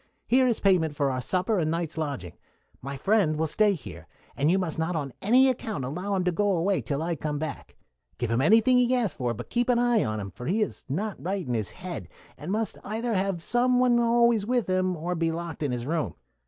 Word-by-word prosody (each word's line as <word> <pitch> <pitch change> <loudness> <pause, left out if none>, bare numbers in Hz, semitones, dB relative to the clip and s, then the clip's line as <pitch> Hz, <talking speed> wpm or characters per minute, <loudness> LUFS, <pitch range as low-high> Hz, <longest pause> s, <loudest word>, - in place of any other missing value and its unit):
Here 255 +1 +4
is 235 - +1
payment 170 -6 +2
for 140 -2 +1
our 130 0 -2
supper 185 - 0
and 155 -2 0
night's 165 -1 -2
lodging. 140 - -4 0.5
My 140 +2 -5
friend 190 -2 +2
will 160 - +1
stay 205 +6 +3
here, 155 -10 -9 0.3
and 145 +3 +1
you 185 - +4
must 175 -4 -2
not 165 +2 -1
on 140 -5 -3
any 250 +6 +5
account 220 - -2
allow 180 +9 -3
him 185 - 0
to 180 - +1
go 200 +1 +1
away 190 +4 +1
till 145 0 -2
I 170 0 -1
come 150 0 -3
back. 155 -2 -6 0.4
Give 120 -2 -2
him 115 +2 +2
anything 225 - +5
he 250 +1 +3
asks 225 -10 0
for; 120 -3 -2
but 120 - -9
keep 240 +1 +1
an 245 - +4
eye 240 -2 +3
on 110 0 -2
him, 100 -1 -6
for 125 - -8
he 210 +6 +2
is - - -6
not 200 +9 -3
right 190 0 -2
in 125 - -1
his 110 -4 -1
head, 185 -1 -7 0.3
and 155 +5 -6
must 215 0 -2
either 225 +3 -2
have 190 -3 -1
some 250 +3 +2
one 245 -1 +4
always 235 -2 +3
with 245 +2 0
him, 185 -1 0
or 170 +3 -2
be 165 -1 0
locked 165 -1 -5
in 145 -4 0
his 120 -1 -3
room. 160 +1 -2
180 Hz, 235 wpm, -27 LUFS, 150-220 Hz, 0.5 s, any